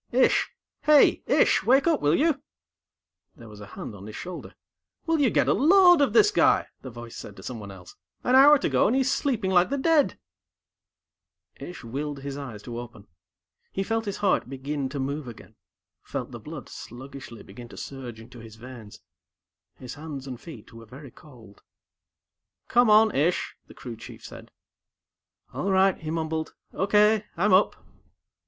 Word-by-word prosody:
"Ish! 255 +2 +3 0.3
Hey, 300 -1 +5
Ish, - - +3
wake 265 +3 +4
up, 330 -3 +2
will 145 +2 +3
you!" 300 -3 +1 0.9
There 115 - -13
was 105 -1 -13
a 100 - -10
hand 105 - -8
on 100 0 -11
his 110 - -9
shoulder. 180 0 -8 0.5
"Will 325 -1 +1
you 275 -4 +3
get - - +1
a - - +4
load 355 - +6
of 275 -6 +3
this 415 - +5
guy!" - - +3 0.2
the 130 - -8
voice 120 -1 -10
said 100 - -9
to 95 - -13
someone 110 -4 -7
else. 95 -2 -13 0.3
"An 250 - +1
hour 285 +3 +8
to - - -2
go, - - +2
and 235 - +1
he's 265 0 +1
sleeping 240 -9 -1
like 180 -1 +4
the 280 - -1
dead." 300 +1 +2 1.4
Ish 175 - -9
willed 140 +4 -5
his 140 0 -6
eyes 125 -8 -8
to 120 -1 -6
open. 115 -4 -11 0.7
He 195 - -2
felt 225 +2 -2
his 200 - -4
heart 185 - +1
begin 135 +1 -4
to 140 +1 -5
move 140 +1 -3
again, 120 - -12 0.5
felt - - -6
the - - -8
blood - - -9
sluggishly 130 -1 -10
beginning 120 +5 -12
to - - -13
surge 125 -5 -8
into 120 +2 -13
his 110 -1 -12
veins. 115 -2 -12 0.7
His 125 - -9
hands 145 -3 -8
and 125 -3 -8
feet 120 -9 -12
were 115 0 -13
very 135 +3 -12
cold. 115 -9 -17 1.1
"Come 245 -1 +4
on, 215 +1 +5
Ish," 160 +6 0
the - - -15
Crew 120 -3 -8
Chief - - -12
said. - - -11 1.0
"All 145 +10 -2
right," 190 0 +3
he 155 - -7
mumbled. 160 -1 -3 0.2
"Okay. 210 +2 +3
I'm 195 +3 +2
up." 190 +3 +4
145 Hz, 175 wpm, -25 LUFS, -, 1.4 s, hour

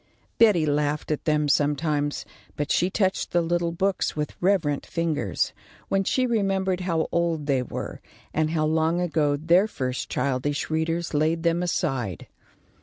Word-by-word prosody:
Betty 205 -9 +5
laughed 150 +1 0
at 150 - -2
them 150 -1 +2
sometimes, 145 0 +1 0.3
but 145 0 -2
she 180 - +2
touched 190 -1 0
the 175 - +2
little 170 0 0
books 190 +3 0
with 150 -1 -3
reverent 175 -7 +1
fingers, 160 - -1 0.4
when 195 0 +2
she 255 +6 +1
remembered 195 -5 0
how 170 -3 0
old 170 -3 0
they 135 -3 +1
were, 125 - -6 0.3
and 155 0 +1
how 155 -1 0
long 160 +2 +1
ago 155 -4 +1
their 170 +7 +4
first 130 -10 -3
childish 140 +3 -1
readers 165 +2 -1
laid 160 +2 +1
them 170 0 +2
aside. 135 - -2
160 Hz, 150 wpm, -25 LUFS, 145-175 Hz, 0.4 s, Betty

